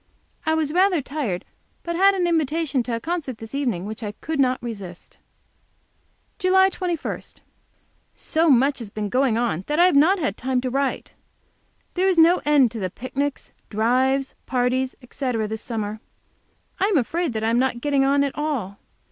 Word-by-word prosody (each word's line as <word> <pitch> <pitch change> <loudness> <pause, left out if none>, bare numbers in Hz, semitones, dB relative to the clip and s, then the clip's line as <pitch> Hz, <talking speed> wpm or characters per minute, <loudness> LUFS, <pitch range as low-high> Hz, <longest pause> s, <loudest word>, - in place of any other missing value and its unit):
I 315 - +3
was 310 -2 -1
rather 365 -1 +3
tired, 275 - -3 0.4
but 340 0 -3
had 390 +3 +5
an 365 -2 +1
invitation 320 -4 +1
to 235 -1 -3
a - - -3
concert 310 -4 -3
this 225 +2 -10
evening 240 -11 -1
which 220 +2 -6
I 210 -2 -4
could 310 +6 -5
not 255 -1 +3
resist. 200 -7 -8 1.2
JULY 380 +1 +4
21. 350 -4 -3 0.9
So 325 +1 +1
much 270 +1 +4
has 230 -4 -7
been 210 0 -4
going 255 -1 +2
on 230 -8 -1
that 300 - -1
I 350 - +6
have 365 - +3
not 325 +8 +5
had 300 -6 -2
time 255 0 0
to 255 0 -3
write. 275 +1 -2 0.8
There 370 +2 +2
is 370 - +1
no 335 +2 +6
end 285 -6 +4
to 230 - -6
the 185 -2 -2
picnics, 270 +7 -4 0.2
drives, 260 +5 +1
parties, 255 +1 0
etc., 245 -3 -2
this 220 +1 -5
summer. 215 -2 -4 0.8
I 385 - +3
am 400 -4 +2
afraid 295 0 -1
I 220 +1 -1
am 235 - +3
not 260 -2 0
getting 280 +1 +1
on 280 +1 +3
at 280 - -2
all. 265 -11 -3
270 Hz, 175 wpm, -23 LUFS, 230-320 Hz, 1.2 s, I